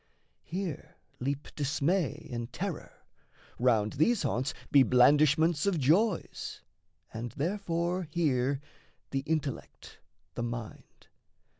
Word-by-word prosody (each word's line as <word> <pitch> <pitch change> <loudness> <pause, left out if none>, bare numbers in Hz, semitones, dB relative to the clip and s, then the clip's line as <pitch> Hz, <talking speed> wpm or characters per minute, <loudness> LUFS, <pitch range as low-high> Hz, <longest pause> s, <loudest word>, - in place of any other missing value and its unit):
Here 175 -3 -5 0.2
leap 140 +3 -3
dismay 150 +1 0
and 120 0 -4
terror; - - -6 0.5
round 110 -4 +3
these 190 - +2
haunts 130 +1 0 0.2
Be 140 - +7
blandishments 150 - +4
of 195 -4 +2
joys; 170 - +1 0.5
and 115 +1 -5
therefore 175 +1 -1
here 140 -4 +1 0.5
The 135 - 0
intellect, 155 -4 -4 0.3
the - - -4
mind. 120 -2 -7
145 Hz, 100 wpm, -30 LUFS, 125-170 Hz, 0.5 s, Be